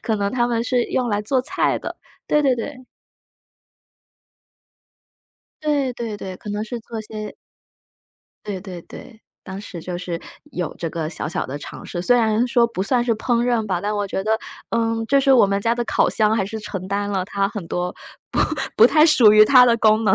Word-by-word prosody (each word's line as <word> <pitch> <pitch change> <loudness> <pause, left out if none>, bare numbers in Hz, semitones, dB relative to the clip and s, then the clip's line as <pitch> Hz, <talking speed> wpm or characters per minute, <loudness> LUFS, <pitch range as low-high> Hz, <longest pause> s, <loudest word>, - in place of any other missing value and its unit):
可 220 -3 0
能 200 -1 -1
他 240 -1 +1
们 230 -1 0
是 245 -1 +1
用 250 -1 -1
来 205 -2 0
做 250 +4 0
菜 - - 0
的。 - - -6 0.3
对 300 - +3
对 270 -4 +2
对。 255 +2 -7 2.8
对 285 -4 0
对 230 -3 -5
对， 185 -2 -7
可 210 - -8
能 210 +1 -2
是 235 +2 -5
做 225 0 -7
些 215 0 -7 1.1
对 200 -3 -4
对 180 -3 -8
对。 225 +4 -13 0.2
当 190 0 -7
时 190 -4 -9
就 175 0 -5
是 175 -2 -4 0.3
有 175 -3 -3
这 165 - -3
个 160 -1 -4
小 155 - -4
小 165 - -2
的 135 +3 -5
尝 - - -9
试。 175 - -5
虽 245 +8 +3
然 225 0 +2
说 235 -1 +4
不 230 -5 -4
算 240 +4 +1
是 235 - +1
烹 235 +2 0
饪 235 -3 +1
吧， 185 -3 -1
但 205 +4 -2
我 205 -1 -1
觉 190 0 -3
得， 220 0 +1 0.3
嗯， 225 -1 0
就 275 +2 +3
是 275 0 +2
我 235 - +6
们 200 0 0
家 230 +3 +1
的 240 - -2
烤 - - +2
箱 215 -1 +3
还 195 -4 0
是 220 +2 -5
承 190 -3 -6
担 205 +1 -1
了 190 -2 0
它 195 0 0
很 205 -6 -7
多 180 0 -2 0.4
不 - - 0 0.3
不 225 - +7
太 305 +3 +5
属 245 -10 +6
于 215 0 +8
它 250 +1 +7
的 235 -1 +4
功 220 -1 +3
能。 195 -3 +4
220 Hz, 225 characters per minute, -21 LUFS, 195-240 Hz, 2.8 s, 于